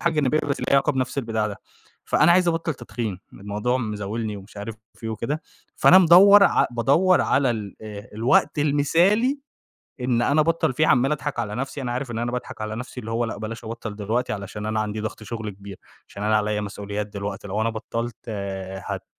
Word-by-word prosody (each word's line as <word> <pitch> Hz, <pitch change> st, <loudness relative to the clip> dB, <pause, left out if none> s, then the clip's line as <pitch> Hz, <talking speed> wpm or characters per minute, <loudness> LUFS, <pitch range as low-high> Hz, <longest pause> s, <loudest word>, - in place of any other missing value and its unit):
حاجة 170 Hz, -, +1 dB
جانبية 150 Hz, 0 st, +2 dB
بس 140 Hz, -2 st, -2 dB
ليها -, -, -3 dB
علاقة 140 Hz, +2 st, +4 dB
بنفس 130 Hz, 0 st, -2 dB
البتاع 110 Hz, -4 st, -1 dB
ده. 100 Hz, -2 st, -5 dB, 0.5 s
فأنا 155 Hz, +3 st, +4 dB
عايز 180 Hz, 0 st, +4 dB
أبطّل 165 Hz, -1 st, -1 dB
تدخين. 110 Hz, -7 st, -5 dB
الموضوع 105 Hz, +5 st, -2 dB
مزاولني 105 Hz, -1 st, -3 dB
ومش 100 Hz, +1 st, -13 dB
عارف 105 Hz, +2 st, -6 dB, 0.2 s
في -, -, -16 dB
إيه 110 Hz, -, -2 dB
وكده. 135 Hz, +8 st, -3 dB, 0.3 s
فأنا 185 Hz, -, +7 dB
مدوّر 190 Hz, +3 st, +8 dB
ع -, -, +4 dB
بادوّر 140 Hz, +11 st, +3 dB
على 135 Hz, -2 st, +2 dB
ال 105 Hz, -4 st, -4 dB
أ 105 Hz, +1 st, -9 dB
الوقت 115 Hz, +6 st, +2 dB
المثالي 170 Hz, -, +3 dB, 0.6 s
إن 125 Hz, -1 st, +1 dB
أنا 145 Hz, +4 st, +3 dB
أبطّل 160 Hz, -2 st, +1 dB
فيه. 155 Hz, +5 st, +2 dB
عَمّال 130 Hz, +3 st, +4 dB
أضحك 145 Hz, -1 st, -4 dB
على 105 Hz, +1 st, -3 dB
نفسي، 135 Hz, +2 st, -4 dB
أنا 125 Hz, -, -3 dB
عارف 125 Hz, -1 st, -3 dB
إن 115 Hz, -, -4 dB
أنا 120 Hz, +1 st, -2 dB
باضحك 125 Hz, -3 st, -5 dB
على 110 Hz, 0 st, -4 dB
نفسي 125 Hz, +1 st, -7 dB
اللي 110 Hz, -1 st, -6 dB
هو 120 Hz, +1 st, 0 dB
لأ 110 Hz, -3 st, -5 dB
بلاش 110 Hz, +2 st, -6 dB
أبطّل 110 Hz, -1 st, -6 dB
دلوقتي 110 Hz, +4 st, -1 dB
علشان 105 Hz, +1 st, -6 dB
أنا 110 Hz, 0 st, 0 dB
عندي 105 Hz, 0 st, -2 dB
ضغط 110 Hz, 0 st, -5 dB
شغل 110 Hz, 0 st, -5 dB
كبير، 100 Hz, -1 st, -11 dB, 0.3 s
عشان 100 Hz, -, -7 dB
أنا 110 Hz, 0 st, +3 dB
عليّا 105 Hz, 0 st, 0 dB
مسؤوليات 105 Hz, 0 st, -4 dB
دلوقتي، 100 Hz, -1 st, -6 dB
لو 105 Hz, +3 st, -1 dB
أنا 115 Hz, -, +1 dB
بطّلت 115 Hz, +1 st, -4 dB
آآ، 95 Hz, -3 st, -5 dB
هت -, -, -5 dB
115 Hz, 205 wpm, -24 LUFS, 105-140 Hz, 0.6 s, مدوّر